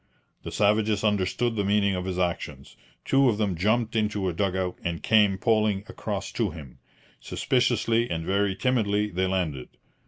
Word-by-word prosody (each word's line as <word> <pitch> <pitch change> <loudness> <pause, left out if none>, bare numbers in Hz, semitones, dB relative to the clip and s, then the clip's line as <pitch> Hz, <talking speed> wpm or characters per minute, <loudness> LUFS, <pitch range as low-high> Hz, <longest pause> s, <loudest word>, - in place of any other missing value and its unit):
The - - -7
savages 105 0 +2
understood 105 +3 0
the 100 - 0
meaning 100 0 +2
of 90 -1 -3
his 95 -1 -3
actions. 80 -6 -3 0.3
Two 135 -1 +4
of 105 - 0
them 105 -4 0
jumped 110 +6 0
into 105 -3 0
a 90 - -1
dug 95 +2 -1
out 95 -1 -2
and 85 -1 -3
came 105 -3 +4
poling 105 -1 +1
across - - -5
to - - -1
him. 70 -5 -11 0.4
Suspiciously 120 -2 0
and 80 -1 -3
very 100 +1 +1
timidly 105 -2 0
they 95 +1 0
landed. 85 -9 -2
100 Hz, 165 wpm, -26 LUFS, 90-110 Hz, 0.4 s, Two